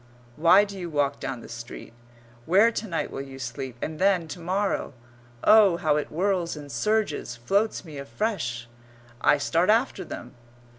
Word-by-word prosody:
Why 170 Hz, +7 st, +6 dB
do 200 Hz, -1 st, -7 dB
you 175 Hz, -2 st, -5 dB
walk 145 Hz, -2 st, 0 dB
down 130 Hz, -3 st, -4 dB
the -, -, -11 dB
street? 115 Hz, 0 st, -9 dB, 0.5 s
Where 200 Hz, +7 st, +5 dB
to 220 Hz, -1 st, -4 dB
night 165 Hz, -4 st, -2 dB
will -, -, -5 dB
you 135 Hz, -1 st, -9 dB
sleep, 130 Hz, 0 st, -6 dB
and 155 Hz, 0 st, -4 dB
then, 185 Hz, -4 st, +3 dB
to 175 Hz, -, -7 dB
morrow? 190 Hz, 0 st, -1 dB, 0.5 s
Oh, 210 Hz, -5 st, +6 dB
how 155 Hz, -4 st, +1 dB
it 150 Hz, -, -2 dB
whirls 180 Hz, 0 st, -1 dB
and 145 Hz, -2 st, -9 dB
surges 155 Hz, -, -1 dB
floats 195 Hz, -, 0 dB
me 150 Hz, -4 st, -8 dB
afresh! 140 Hz, -, -3 dB, 0.5 s
I 145 Hz, -, +5 dB
start 165 Hz, +6 st, +1 dB
after 230 Hz, +5 st, +2 dB
them. 120 Hz, -, -8 dB
165 Hz, 165 wpm, -26 LUFS, 140-200 Hz, 0.5 s, Why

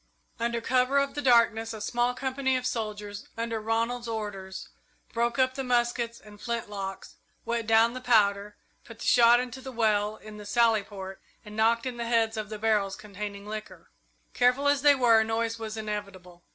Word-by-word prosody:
Under 235 Hz, 0 st, -1 dB
cover 255 Hz, +3 st, +2 dB
of 280 Hz, 0 st, +1 dB
the 290 Hz, -, -3 dB
darkness 230 Hz, -3 st, +3 dB
a 220 Hz, -, -7 dB
small 240 Hz, +3 st, 0 dB
company 265 Hz, 0 st, -1 dB
of 255 Hz, -, -5 dB
soldiers, 210 Hz, -4 st, -4 dB
under 230 Hz, -1 st, -2 dB
Ronald's 230 Hz, +2 st, -1 dB
orders, 205 Hz, -4 st, -5 dB, 0.4 s
broke 235 Hz, +1 st, 0 dB
up 260 Hz, -1 st, +3 dB
the 270 Hz, 0 st, -4 dB
muskets 240 Hz, -1 st, 0 dB
and 210 Hz, -1 st, -15 dB
flint 235 Hz, -3 st, -3 dB
locks, 195 Hz, -1 st, -6 dB, 0.3 s
wet 230 Hz, -1 st, -2 dB
down 225 Hz, +1 st, +4 dB
the 255 Hz, -, -6 dB
powder, 210 Hz, -4 st, +2 dB, 0.3 s
put 230 Hz, -, -12 dB
the -, -, -7 dB
shot 240 Hz, 0 st, +6 dB
into 250 Hz, +1 st, -5 dB
the 265 Hz, -, -7 dB
well 215 Hz, -3 st, +1 dB
in 215 Hz, -1 st, -11 dB
the 210 Hz, -, -10 dB
sally 230 Hz, -2 st, +3 dB
port, 195 Hz, -1 st, -9 dB, 0.2 s
and 210 Hz, 0 st, -10 dB
knocked 230 Hz, +2 st, +2 dB
in 250 Hz, -2 st, -4 dB
the 235 Hz, -1 st, -3 dB
heads 225 Hz, -1 st, +2 dB
of 215 Hz, -1 st, -4 dB
the 215 Hz, -, -5 dB
barrels 210 Hz, -3 st, +1 dB
containing 205 Hz, -1 st, -7 dB
liquor. 215 Hz, 0 st, -8 dB, 0.4 s
Careful 250 Hz, +3 st, +3 dB
as 285 Hz, -1 st, +3 dB
they 290 Hz, 0 st, +6 dB
were, 235 Hz, -4 st, +5 dB
noise 225 Hz, +1 st, -2 dB
was 220 Hz, 0 st, -5 dB
inevitable. 200 Hz, -5 st, -6 dB
225 Hz, 185 wpm, -28 LUFS, 210-240 Hz, 0.4 s, shot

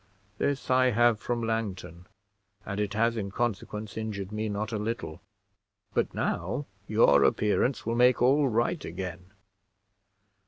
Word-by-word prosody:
This 140 Hz, -2 st, -1 dB
I 130 Hz, 0 st, +5 dB
have 120 Hz, -1 st, +3 dB
from 120 Hz, 0 st, -2 dB
Langton; 100 Hz, -6 st, -3 dB, 0.6 s
and 100 Hz, 0 st, -4 dB
it 105 Hz, -1 st, -2 dB
has 115 Hz, +1 st, +2 dB
in 100 Hz, -3 st, -3 dB
consequence 105 Hz, -1 st, -3 dB
injured 105 Hz, -3 st, -4 dB
me 105 Hz, 0 st, -2 dB
not 105 Hz, +2 st, -3 dB
a 110 Hz, -, -2 dB
little: 105 Hz, -7 st, -4 dB, 0.7 s
but -, -, +1 dB
now 145 Hz, -, -2 dB, 0.2 s
your 70 Hz, -11 st, +5 dB
appearance 105 Hz, -, +1 dB
will 115 Hz, -, 0 dB
make 125 Hz, +1 st, +4 dB
all 135 Hz, +4 st, +4 dB
right 120 Hz, +7 st, 0 dB
again. 90 Hz, 0 st, -6 dB
110 Hz, 135 wpm, -28 LUFS, 100-120 Hz, 0.7 s, I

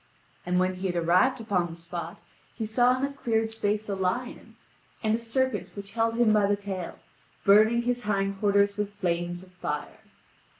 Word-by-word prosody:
And 180 Hz, 0 st, +2 dB
when 185 Hz, 0 st, +2 dB
he 190 Hz, +1 st, -2 dB
had 175 Hz, -, -2 dB
arrived 180 Hz, +10 st, +3 dB
upon 195 Hz, -6 st, 0 dB
the 165 Hz, -, -9 dB
spot 170 Hz, 0 st, -7 dB, 0.4 s
he 225 Hz, -, -3 dB
saw 245 Hz, +3 st, +3 dB
in 265 Hz, -, 0 dB
a 280 Hz, -, -5 dB
cleared 225 Hz, -4 st, 0 dB
space 215 Hz, -1 st, -1 dB
a 200 Hz, -, -2 dB
lion, 195 Hz, +7 st, -3 dB, 0.5 s
and 215 Hz, 0 st, +2 dB
a 225 Hz, -, +1 dB
serpent 260 Hz, +3 st, -1 dB
which 200 Hz, 0 st, -8 dB
held 225 Hz, +1 st, 0 dB
him 230 Hz, -2 st, +4 dB
by 210 Hz, -2 st, +4 dB
the 205 Hz, -, +2 dB
tail, 195 Hz, -3 st, -6 dB, 0.5 s
burning 215 Hz, +4 st, +6 dB
his 245 Hz, 0 st, 0 dB
hind 195 Hz, -2 st, -1 dB
quarters 200 Hz, 0 st, +3 dB
with 205 Hz, -1 st, -2 dB
flames 175 Hz, -2 st, -2 dB
of 185 Hz, -, -17 dB
fire. 150 Hz, -5 st, -5 dB
205 Hz, 185 wpm, -27 LUFS, 185-225 Hz, 0.5 s, burning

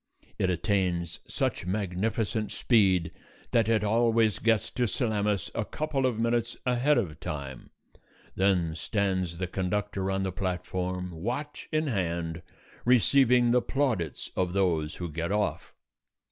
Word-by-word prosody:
It 95 Hz, -, +2 dB
attains 90 Hz, -2 st, 0 dB
such -, -, -2 dB
magnificent 105 Hz, +3 st, -1 dB
speed 95 Hz, -8 st, +3 dB, 0.4 s
that 115 Hz, -2 st, +3 dB
it 110 Hz, -2 st, +3 dB
always 115 Hz, 0 st, +3 dB
gets 115 Hz, -1 st, +2 dB
to 125 Hz, -1 st, 0 dB
Salamis 105 Hz, -3 st, 0 dB
a 115 Hz, -, -1 dB
couple 140 Hz, +2 st, -1 dB
of 120 Hz, -4 st, -1 dB
minutes 115 Hz, +1 st, 0 dB
ahead 125 Hz, +4 st, +3 dB
of 80 Hz, -10 st, -2 dB
time. 70 Hz, -4 st, -6 dB, 0.6 s
Then 95 Hz, -4 st, +2 dB
stands 95 Hz, -2 st, -1 dB
the 90 Hz, -, -1 dB
conductor 95 Hz, +1 st, -2 dB
on 95 Hz, 0 st, 0 dB
the 95 Hz, -, -1 dB
platform, 90 Hz, -1 st, -3 dB
watch 120 Hz, -, -5 dB
in 155 Hz, 0 st, +1 dB
hand, 85 Hz, -, -2 dB, 0.4 s
receiving 125 Hz, 0 st, +4 dB
the 125 Hz, 0 st, +4 dB
plaudits 125 Hz, -, -1 dB
of 90 Hz, -1 st, 0 dB
those 85 Hz, -6 st, +1 dB
who 90 Hz, -, -4 dB
get 85 Hz, +3 st, -3 dB
off. 105 Hz, 0 st, -1 dB
100 Hz, 130 wpm, -28 LUFS, 90-115 Hz, 0.6 s, receiving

